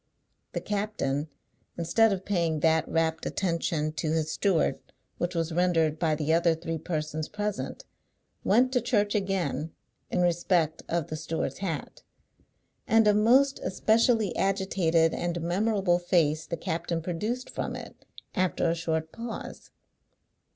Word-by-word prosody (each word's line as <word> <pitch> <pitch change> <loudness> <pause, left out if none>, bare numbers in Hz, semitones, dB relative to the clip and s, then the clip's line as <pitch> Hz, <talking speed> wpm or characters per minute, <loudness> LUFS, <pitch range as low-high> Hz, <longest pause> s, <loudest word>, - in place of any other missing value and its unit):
The - - -2
captain, 200 -9 -2 0.5
instead 190 +7 +3
of 190 -1 -3
paying 170 -6 0
that 160 0 +3
rapt 165 0 0
attention 165 -4 -1
to 155 0 -2
his 160 -1 0
steward 190 -6 +1 0.4
which 175 +1 -2
was 165 0 -1
rendered 165 -3 +2
by 160 -3 +2
the 155 +1 0
other 170 0 +3
three 165 0 -4
persons 155 -1 -3
present, 210 -1 -4 0.6
went 250 +5 +4
to 250 -2 +2
Church 210 -3 +1
again, 190 -7 -1 0.4
in 180 - 0
respect 175 -2 +1
of 170 -2 -1
the 155 - -3
steward's 160 +1 -3
hat. 165 -6 -4 0.9
And 225 0 +5
a 210 - +6
most 255 +6 +4
especially 220 0 +2
agitated 190 -4 +2
and 175 0 -2
memorable 185 +1 +1
face 160 -3 +1
the 170 - -3
captain 165 +1 -3
produced 215 +9 -3
from - - -3
it, - - -10 0.3
after 185 -2 +1
a 165 - +2
short 160 -1 -2
pause. 230 0 -7
170 Hz, 135 wpm, -28 LUFS, 160-200 Hz, 0.9 s, a